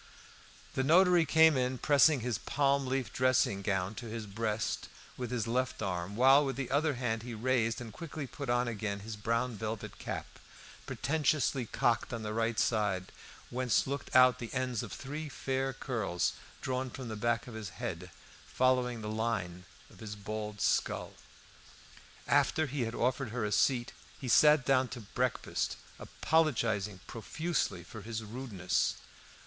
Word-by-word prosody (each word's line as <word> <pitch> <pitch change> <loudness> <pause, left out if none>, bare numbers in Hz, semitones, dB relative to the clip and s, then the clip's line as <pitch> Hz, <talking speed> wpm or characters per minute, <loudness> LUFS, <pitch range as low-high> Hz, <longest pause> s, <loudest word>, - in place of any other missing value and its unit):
The - - 0
notary 175 +2 +5
came 160 -1 +6
in 130 0 0
pressing 145 0 +4
his 120 -3 -1
palm 140 -1 +1
leaf 130 -1 -2
dressing 130 -6 +2
gown 95 0 -1
to 120 - -7
his 110 0 -5
breast 105 +1 -2 0.3
with 125 -2 -4
his 120 -3 -1
left 130 +2 -1
arm, 90 0 -3
while 135 +5 +6
with 135 -2 -2
the 135 -3 -4
other 145 +1 +2
hand 115 -3 -1
he 120 0 -6
raised 115 0 +1
and 115 -3 -8
quickly 155 -1 -6
put 140 0 -7
on 120 0 +2
again 105 -3 -3
his 110 +1 -6
brown 115 +3 -1
velvet 110 +1 -5
cap, - - -4 0.6
pretentiously 140 -4 0
cocked 115 +2 +1
on 115 -2 -4
the 105 0 -3
right 115 0 0
side, 105 -6 +1 0.4
whence 125 -3 +2
looked 140 -1 -4
out 130 -1 +7
the 120 - -6
ends 125 -4 -1
of - - -7
three 150 +3 -5
fair 135 0 -2
curls 110 -9 -1 0.3
drawn 130 0 -2
from 130 0 -7
the 110 - -4
back 120 +2 0
of 125 - -9
the 110 -4 -6
head, 95 -7 -5 0.4
following 125 -2 +1
the - - -4
line 105 -5 -2 0.3
of - - -17
his 105 -2 -6
bald 105 0 -5
skull. - - 0 1.1
After 160 - +3
he 135 -3 -2
had 115 +1 -4
offered 125 +1 0
her 115 0 -2
a 105 - -2
seat 120 +3 +2 0.3
he 130 - -6
sat 150 +2 +6
down 130 -1 +3
to 120 +1 -7
breakfast, 125 +4 -2 0.2
apologising 110 - 0
profusely 120 - -2
for 110 +5 -10
his 110 +1 -5
rudeness. 105 -5 -1
120 Hz, 160 wpm, -32 LUFS, 110-130 Hz, 1.1 s, out